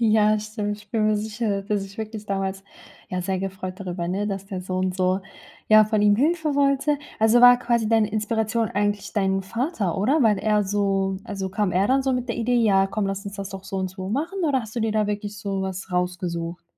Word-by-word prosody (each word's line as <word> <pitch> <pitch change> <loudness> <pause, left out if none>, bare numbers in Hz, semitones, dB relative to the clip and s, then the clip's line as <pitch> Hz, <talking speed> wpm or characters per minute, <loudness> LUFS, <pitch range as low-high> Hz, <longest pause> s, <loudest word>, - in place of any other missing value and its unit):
Ja, 215 -1 +4
stimmt, 210 -1 -4
ich 205 -1 -18
bin 215 -2 +1
mir 215 - +3
sicher, 210 -1 -2
dass 200 - -21
er 210 - +2
sich 195 +1 -8
wirklich 215 -1 -6
damals 195 -1 -2 0.5
ja 185 0 -3
sehr 190 +1 -1
gefreut 190 -1 -5
darüber, 180 -3 -4
ne, 195 +3 -1
dass 195 -1 -4
der 190 -2 -5
Sohn 185 0 -1
so 185 +1 +1 0.5
ja, 215 0 +8
von 215 -1 0
ihm 205 0 +5
Hilfe 310 +3 +1
wollte. 280 +1 +2 0.2
Also, 225 +2 +5
war 245 0 +8
quasi 235 -3 0
deine 220 -2 +3
Inspiration 220 +1 0
eigentlich 205 0 -1
dein 195 -2 +1
Vater, 225 - -2
oder? 260 +10 +2
Weil 215 -4 +4
er 210 0 +2
so 195 -1 0
also, 195 -2 -4
kam 200 -1 -1
er 190 +3 +2
dann 270 +1 +2
so 265 -1 +1
mit 250 0 -2
der 235 - -2
Idee: 240 +1 +1
„Ja 195 -4 +4
komm, 200 0 -2
lass 195 +1 -3
uns 200 0 -7
das 195 -1 -5
doch 190 -1 -8
so 195 - -5
und 190 0 -1
so 190 0 -7
machen”? 310 - -2
Oder 275 -3 +2
hast 220 0 -10
du 235 - 0
dir 220 -1 0
da 215 -1 +1
wirklich 205 0 -4
so 195 -1 -3
was 190 0 -5
rausgesucht? 180 -1 -2
205 Hz, 230 wpm, -24 LUFS, 195-225 Hz, 0.5 s, ja